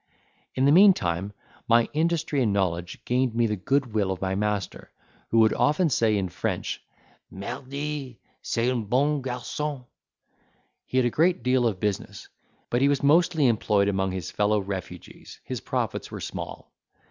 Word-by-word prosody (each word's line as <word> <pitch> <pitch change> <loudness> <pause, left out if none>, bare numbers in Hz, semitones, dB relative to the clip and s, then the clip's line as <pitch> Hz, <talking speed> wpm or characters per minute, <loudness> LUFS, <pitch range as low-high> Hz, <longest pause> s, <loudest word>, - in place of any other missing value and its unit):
In 130 - +2
the 140 - +5
meantime, 105 - +4 0.4
my 115 0 +4
industry 160 -2 0
and 110 -4 +2
knowledge 90 -3 -2
gained 125 -1 0
me 120 0 +3
the 105 -1 0
goodwill 110 -1 0
of 95 - -4
my 95 0 -1
master, 105 0 -3 0.4
who 115 - +1
would 110 -1 +4
often 150 +2 +2
say 110 -4 +2
in 95 -2 -1
French, - - -3 0.5
"Mardy! 135 +5 -5 0.2
c'est 115 +2 0
un 120 -4 -2
bon 140 +6 +1
garçon." 130 +2 -4 1.0
He 130 - -2
had 130 - +4
a 120 - +1
great 170 -1 +2
deal 125 -1 +3
of 100 -5 -2
business; 105 0 -3 0.4
but 120 - +1
he 140 - +4
was 140 -1 0
mostly 160 +1 +4
employed 105 -4 +2
among 95 -1 0
his 95 -3 -5
fellow 105 +1 +1
refugees, 95 -2 -8
his - - -5
profits - - -3
were - - -7
small. - - -7
120 Hz, 160 wpm, -26 LUFS, 100-140 Hz, 1.0 s, the